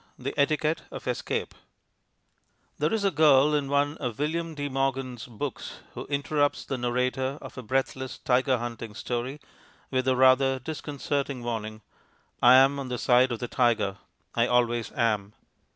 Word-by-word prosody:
The 135 +2 -4
Etiquette 155 +2 +1
of - - -8
Escape - - -2 1.3
There - - +1
is 220 -2 0
a 195 - +3
girl 150 -2 +5
in 145 -2 0
one 145 +2 +1
of 120 -5 -4
William 165 +2 -2
de 145 -1 -3
Morgan's 135 -3 -2
books 125 +3 -6
who - - -7
interrupts 145 0 0
the 135 - -3
narrator 125 +2 -1
of - - -10
a 130 - -6
breathless 130 +2 -2
tiger 130 +1 +2
hunting 115 -2 -6
story 125 +5 -3 0.5
with 130 -1 0
the 130 -1 +3
rather 130 +1 +5
disconcerting 140 -2 -3
warning, 110 -2 -4 0.6
"I'm 135 +3 +6
on 135 - -4
the 125 - -2
side 125 +1 +4
of 120 - -2
the 120 - -4
tiger; 110 -6 +1 0.4
I 115 0 +2
always 120 -2 +1
am." 105 -3 0
130 Hz, 150 wpm, -27 LUFS, 120-140 Hz, 1.3 s, I'm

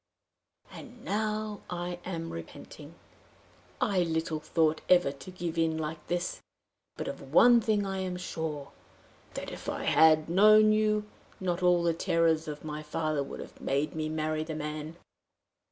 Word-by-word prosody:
And 245 -2 -12
now 215 0 -2
I 175 0 -4
am 165 -3 -4
repenting! 85 -1 -10 0.8
I 195 -2 +1
little 160 -2 -1
thought 155 0 +1
ever 180 -6 +5
to 140 +5 -11
give 175 -2 -4
in 160 -1 +1
like 155 0 -5
this! 175 0 -2 0.6
But - - -4
of 135 - -7
one 240 +8 +7
thing 210 -2 +1
I 195 0 -3
am 185 -1 -3
sure 155 -5 -5 0.6
that, - - -5
if - - -6
I - - -3
had 155 -1 +5
known 215 +4 +6
you, 215 0 +2 0.3
not 180 -1 -1
all 180 -1 +4
the 170 -1 +2
terrors 165 -1 +1
of 150 0 -6
my 150 0 -5
father 155 -1 -1
would 140 - -6
have - - -12
made 140 +3 0
me 155 -1 -2
marry 155 0 -1
the 160 0 -5
man." 155 +1 -5
165 Hz, 155 wpm, -29 LUFS, 155-185 Hz, 0.8 s, one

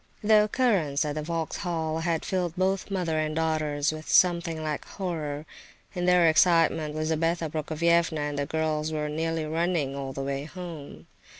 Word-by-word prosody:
The 210 0 +5
occurrence 195 - +1
at 150 - -2
the 155 - -3
Vauxhall 165 0 -2
had 165 -1 -1
filled 180 -3 -1
both 190 +2 0
mother 175 -5 -1
and 155 0 -1
daughters 155 -2 0
with 155 0 -8
something 170 -3 +3
like 155 -1 -3
horror. 155 -6 -4 0.5
In 180 -2 -2
their 180 -2 +5
excitement 160 -2 +3
Lizabetha 160 +1 0
Prokofievna 160 +1 +1
and 145 -1 -2
the 140 - -1
girls 155 -1 -1
were 150 -1 -2
nearly 160 +1 -2
running 160 -3 -1
all 135 -1 -4
the 135 +1 -5
way 140 +1 -3
home. 155 - -9
160 Hz, 160 wpm, -27 LUFS, 150-170 Hz, 0.5 s, The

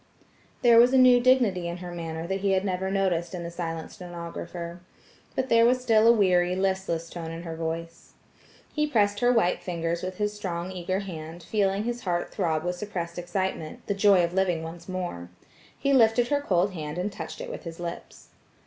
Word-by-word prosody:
There 235 -1 +7
was 245 +2 +6
a - - +6
new 255 -1 +7
dignity 240 -8 +3
in 170 +1 -4
her 180 0 -7
manner 165 -1 -5
that 190 +2 -2
he 195 0 +1
had 190 +1 +1
never 190 0 -1
noticed 185 -2 0
in 175 - -5
the 170 - -5
silent 165 -2 -5
stenographer. 170 0 -7 0.5
But 260 0 -1
there 230 0 +5
was 250 +2 +4
still 225 -3 +4
a - - +9
weary, 180 -5 +3
listless 190 -3 -1
tone 165 -1 -6
in 165 +1 -7
her 165 -2 -5
voice. 165 +1 -5 0.6
He 300 -1 +1
pressed 205 -6 +2
her 245 +2 +4
white 220 -7 +2
fingers 170 -1 -2
with 185 0 -5
his 210 0 -1
strong 185 -3 -4
eager 185 +1 -2
hand, 165 -3 -8
feeling 200 +1 0
his 240 +1 -3
heart 175 -2 -2
throb 160 -5 0
with 180 0 -2
suppressed 175 -4 -5
excitement–the 175 0 -3
joy 195 -2 +5
of 170 0 -1
living 180 -4 +1
once 170 +2 -9
more. 175 - -4 0.5
He 275 - +1
lifted 240 -1 +4
her 285 -1 +1
cold 190 -6 +1
hand 155 -2 -5
and 185 +4 -2
touched - - -7
it - - -6
with - - -7
his 165 0 -8
lips. 170 0 -7
185 Hz, 195 wpm, -27 LUFS, 170-210 Hz, 0.6 s, a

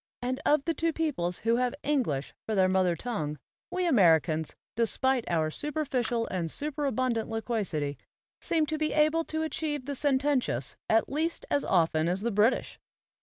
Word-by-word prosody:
And 255 +1 -3
of 295 -2 +3
the 330 - +1
two 330 +1 0
peoples 255 - -1
who 230 +1 +3
have 250 -1 0
English 245 - 0
for 220 - -1
their 190 -1 +4
mother 185 -2 +2
tongue, 155 -10 -3 0.3
we 365 0 -1
Americans, 160 - +3 0.2
despite 245 +2 +1
our 160 -2 +1
superficial 260 - -1
and 175 -3 -2
superabundant 260 - -1
loquacity, 200 - -2 0.4
seem 320 -2 +1
to 310 0 -3
be 310 0 0
able 310 +2 +3
to 315 0 -2
achieve 300 -3 -3
the 285 - -3
sententious 265 - 0
at 225 +1 +3
least 320 +4 -2
as 285 - +2
often 160 -3 +2
as 185 +2 -1
the 235 +2 -1
British. 210 +4 +1
245 Hz, 160 wpm, -29 LUFS, 180-295 Hz, 0.4 s, their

